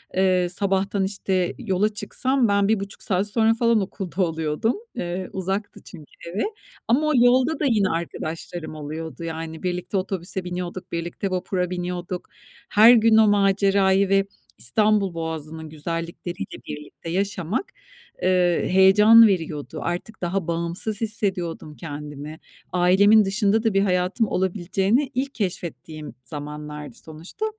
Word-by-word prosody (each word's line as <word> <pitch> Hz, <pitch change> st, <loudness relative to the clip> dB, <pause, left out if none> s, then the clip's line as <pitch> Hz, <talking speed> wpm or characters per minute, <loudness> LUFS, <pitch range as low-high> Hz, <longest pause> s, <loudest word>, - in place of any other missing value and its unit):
eee, 185 Hz, -1 st, +3 dB
sabahtan, 195 Hz, +1 st, 0 dB
işte, 190 Hz, -2 st, -1 dB
yola 210 Hz, -3 st, 0 dB
çıksam 260 Hz, +4 st, 0 dB
ben 200 Hz, -1 st, +2 dB
1,5 200 Hz, -2 st, -2 dB
saat 190 Hz, +1 st, 0 dB
sonra 220 Hz, +1 st, +3 dB
falan 230 Hz, -1 st, +2 dB
okulda 190 Hz, -1 st, -4 dB
oluyordum. 160 Hz, +5 st, 0 dB, 0.2 s
Eee, 180 Hz, +1 st, -4 dB
uzaktı 195 Hz, +2 st, -3 dB
çünkü 160 Hz, -6 st, -11 dB, 0.3 s
evi. 200 Hz, -, 0 dB, 0.4 s
Ama 285 Hz, +7 st, +3 dB
o -, -, +2 dB
yolda 255 Hz, +5 st, +4 dB
da 305 Hz, -, 0 dB
yine 215 Hz, -7 st, +3 dB
arkadaşlarım 165 Hz, 0 st, -5 dB
oluyordu. 160 Hz, +2 st, -6 dB
Yani, 160 Hz, -1 st, -6 dB
birlikte 180 Hz, +2 st, -2 dB
otobüse 190 Hz, -1 st, -3 dB
biniyorduk, 180 Hz, 0 st, -5 dB
birlikte 170 Hz, +3 st, -3 dB
vapura 180 Hz, 0 st, -1 dB
biniyorduk. 180 Hz, 0 st, -4 dB, 0.4 s
Her 220 Hz, +4 st, +8 dB
gün 225 Hz, -1 st, +5 dB
o 220 Hz, -1 st, +6 dB
macerayı 195 Hz, -1 st, +3 dB
ve 195 Hz, 0 st, +3 dB, 0.3 s
İstanbul 205 Hz, -, +2 dB
Boğazı'nın 160 Hz, -1 st, -5 dB
güzellikleriyle 165 Hz, +3 st, -5 dB
birlikte 150 Hz, +2 st, -8 dB
yaşamak, 190 Hz, -, -1 dB, 0.6 s
eee, 180 Hz, -2 st, +2 dB
heyecan 210 Hz, +5 st, +7 dB
veriyordu. 160 Hz, -5 st, -2 dB
Artık 180 Hz, +6 st, -4 dB
daha 180 Hz, 0 st, -2 dB
bağımsız 170 Hz, +6 st, -3 dB
hissediyordum 185 Hz, -8 st, -3 dB
kendimi. 150 Hz, 0 st, -8 dB, 0.3 s
Ailemin 195 Hz, +4 st, +5 dB
dışında 205 Hz, +2 st, +1 dB
da 225 Hz, -3 st, +1 dB
bir 195 Hz, -, +3 dB
hayatım 185 Hz, +3 st, +1 dB
olabileceğini 195 Hz, +8 st, 0 dB
ilk 270 Hz, +2 st, -2 dB
keşfettiğim 170 Hz, -6 st, -5 dB
zamanlardı 150 Hz, +2 st, -7 dB
sonuçta. 160 Hz, -, -7 dB
185 Hz, 125 wpm, -23 LUFS, 170-205 Hz, 0.6 s, Her